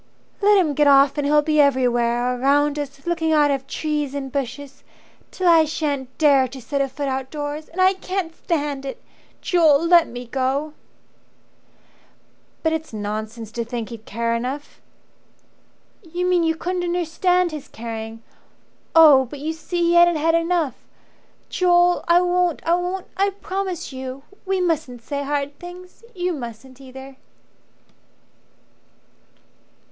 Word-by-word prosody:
Let 410 0 +5
him 330 -6 +2
get 295 +1 +3
off 275 0 +5
and 285 - 0
he'll 295 0 +4
be 305 0 +3
everywhere 245 -2 +2
Around 290 +2 +2
us, 275 -1 -7
looking 335 -2 0
out 295 -2 +4
of 270 -1 -3
trees 295 -2 -2
and 270 -2 -5
bushes 275 +1 -5 0.5
Till 370 - -2
I 330 -2 +7
sha'n't 285 -4 -3
dare 280 -4 +4
to 260 +2 -10
set 270 +4 -2
a 275 - +1
foot 285 +2 -4
outdoors. 290 +3 -4
And 350 - -9
I 375 +1 +5
can't 370 -3 -4
stand 290 -4 -2
it. 270 - -6 0.4
Joel, 325 -3 +4
let 340 -1 +5
me 245 +1 -8
go!" 270 +5 -2 1.9
"But 320 -1 +1
it's 320 0 -4
nonsense 215 +1 -5
to 235 +1 -3
think 230 -1 -5
he'd 225 -2 -10
care 230 +2 -1
enough." 255 +5 -5 1.2
"You 350 -1 -4
mean 360 -1 +3
you 325 0 +1
couldn't 360 +2 -3
understand 355 +1 +1
his 305 -3 -7
caring. 225 0 -7 0.7
Oh, 295 -5 +8
but 285 +4 -9
you 305 +3 -3
see 345 +2 -3
he - - +3
hadn't 345 0 +6
had 320 +2 +1
enough 335 -4 +1 0.8
Joel, 355 -1 +3
I 340 +1 +5
won't 355 -2 0
I 335 - +3
won't 360 +1 -2
I 395 +1 +2
promise 380 -5 -5
you. 260 +1 -7 0.2
We 380 -1 0
mustn't 310 -9 -2
say 280 +4 -4
hard 285 0 -3
things. 360 +3 -12
You 360 0 -1
mustn't 255 -1 -9
either." 265 0 -11
295 Hz, 145 wpm, -22 LUFS, 265-345 Hz, 1.9 s, Oh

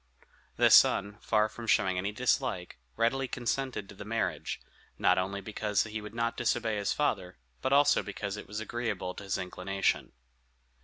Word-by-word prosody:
The - - +4
son, 100 +1 +5
far 110 -1 +2
from 115 +1 -9
showing 95 -3 +3
any 100 +3 -1
dislike, 105 - -1 0.2
readily 130 +4 +1
consented 125 -3 -2
to - - -11
the 100 - -9
marriage; 115 +2 -2 0.4
not 90 0 +4
only 100 +2 -2
because 105 0 0
he 110 0 -5
would 105 +2 -9
not 115 0 0
disobey 110 -2 0
his 100 -1 0
father, 95 -11 -1 0.2
but 130 - -1
also 140 +1 +5
because 100 0 -5
it 105 - -8
was 105 +1 -5
agreeable 110 -5 -3
to - - -9
his 95 - -1
inclination. 95 +1 -1
105 Hz, 165 wpm, -30 LUFS, 100-115 Hz, 0.4 s, son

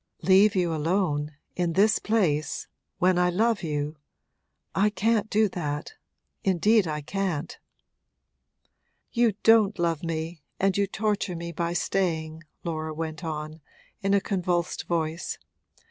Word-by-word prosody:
'Leave 195 +2 +5
you 175 -3 +1
alone 155 -2 0 0.2
in 175 -2 0
this 210 +5 +4
place 175 -9 0 0.3
when 180 -1 +3
I 180 0 +4
love 220 +4 +1
you? 150 -2 -3 0.8
I 200 +2 +3
can't 215 +1 +1
do 215 +1 +3
that 150 - -4 0.5
indeed 195 +2 +3
I 150 -1 -2
can't.' 175 -1 -3 1.5
'You 235 -3 +3
don't 220 -2 +5
love 170 -3 0
me 165 0 -3 0.2
and 195 -1 +2
you 200 0 +2
torture 205 -2 -1
me 170 0 -5
by 170 +1 -2
staying!' 165 -4 -1 0.2
Laura 155 -2 -3
went 160 +1 -5
on, 155 0 -5 0.4
in 195 0 +2
a 200 - +3
convulsed 180 -4 -1
voice. 165 -1 -2
175 Hz, 130 wpm, -26 LUFS, 160-200 Hz, 1.5 s, Leave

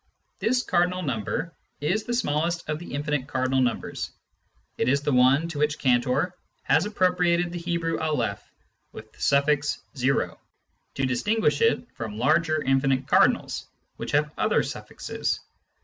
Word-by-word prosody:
This 250 +2 +1
cardinal 180 +1 +1
number 140 - -2 0.3
is 190 +9 0
the 240 - -2
smallest 170 -4 0
of 155 0 -2
the 175 - -9
infinite 145 -2 -1
cardinal 130 -1 +1
numbers; 125 -3 -2 0.7
it - - +2
is 140 +2 +2
the 145 - +1
one 130 +6 +4
to 155 -3 -5
which 150 0 +1
Cantor 130 +7 +1 0.3
has 160 +8 +3
appropriated 180 -3 +2
the 175 - -4
Hebrew 170 -1 -1
Aleph 130 -11 -1 0.5
with 110 0 -11
the - - -18
suffix 145 +1 +2 0.2
o, 135 +1 +1 0.6
to 135 - 0
distinguish 150 - +1
it 230 +1 +2
from 110 -2 -6
larger 155 +5 +2
infinite 135 0 +1
cardinals, - - +2 0.3
which - - -5
have 150 +1 +2
other - - +2
suffixes. - - -4
150 Hz, 145 wpm, -26 LUFS, 130-175 Hz, 0.7 s, one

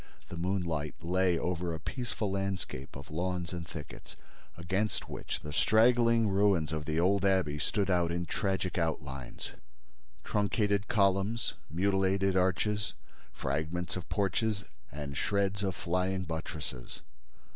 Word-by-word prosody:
The - - -5
moonlight 85 -4 -1
lay 90 0 +3
over 85 -1 -1
a - - -6
peaceful 110 - -3
landscape 95 -9 -3
of 70 +1 -9
lawns 90 +1 -2
and 85 -1 -5
thickets, 75 -5 -9 0.4
against 95 +6 -1
which - - -4
the 75 - -6
straggling 115 +3 +5
ruins 95 -6 +3
of 80 -1 -2
the 80 +1 0
old 95 +2 +3
abbey 95 -7 +2
stood 100 +5 +1
out 85 -2 +3
in 85 0 -1
tragic 95 0 -1
outlines, 70 -6 -3 0.7
truncated 105 -1 +1
columns, 100 +2 +2 0.2
mutilated 95 +2 +2
arches, 100 +3 +1 0.4
fragments 80 +5 -2
of 85 -4 -6
porches 100 +1 +1 0.3
and 70 0 -5
shreds 100 0 +1
of 95 -2 0
flying 90 +2 0
buttresses. 80 -5 -5
90 Hz, 125 wpm, -31 LUFS, 80-100 Hz, 0.7 s, straggling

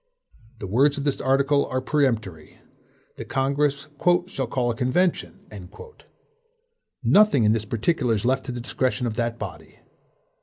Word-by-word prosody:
The 105 - -7
words 135 +9 +2
of 140 - -3
this 145 -2 -1
article 140 +2 +2
are 130 - -2
peremptory. 115 - -2 0.6
The - - -6
Congress 140 +1 0 0.4
"shall 135 -8 -4
call 120 0 -1
a - - -5
convention." 160 +10 -1 1.6
Nothing 205 - +4
in 105 - +4
this 110 -1 -2
particular 120 +2 0
is 105 +2 -3
left 130 +2 0
to - - -3
the 120 -1 -5
discretion 130 0 -1
of 115 -2 -3
that 115 -1 -1
body. - - -9
130 Hz, 145 wpm, -24 LUFS, 115-140 Hz, 1.6 s, Nothing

